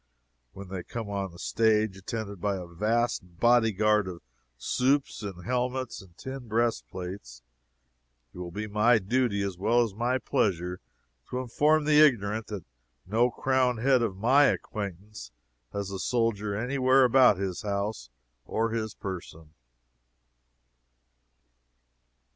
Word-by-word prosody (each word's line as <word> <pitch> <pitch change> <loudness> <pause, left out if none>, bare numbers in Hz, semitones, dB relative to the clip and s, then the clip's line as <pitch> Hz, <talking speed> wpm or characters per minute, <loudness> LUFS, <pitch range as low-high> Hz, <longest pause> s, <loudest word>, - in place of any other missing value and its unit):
And - - -40
when 95 -1 -9
they 95 -1 -4
come 110 +3 -6
on 100 -2 -3
the 85 - -14
stage 110 0 +1
attended 100 0 -6
by 100 0 0
a 90 -2 -6
vast 110 +8 0 0.2
body 120 -1 +4
guard 105 0 +2
of 90 -2 -8 0.3
supes 135 - 0
in 95 -4 -7
helmets 125 +3 -2
and 90 -3 -19
tin 130 -2 -7
breastplates, 100 - -3 0.9
it - - -11
will 90 -1 -5
be 105 +5 -5
my 105 +3 +3
duty 110 0 0
as 95 -3 -4
well 120 +5 +3
as 110 -4 -4
my 120 +4 0
pleasure 90 -9 -1 0.5
to 125 - -3
inform 150 +5 +2
the 150 0 +4
ignorant 110 -6 +2
that 105 -5 -6 0.4
no 115 +6 +2
crowned 130 -1 +1
head 130 +2 +3
of 105 -5 -1
my 130 +8 +5
acquaintance 100 - -4 0.4
has 100 -1 -4
a 95 - -5
soldier 105 -3 0
any 125 +6 -2
where 130 +1 +5
about 125 -4 +5
his 95 -2 -3
house 100 - -3 0.3
or 115 - -1
his 110 -2 -3
person. 85 -5 -8
110 Hz, 140 wpm, -28 LUFS, 95-120 Hz, 0.9 s, my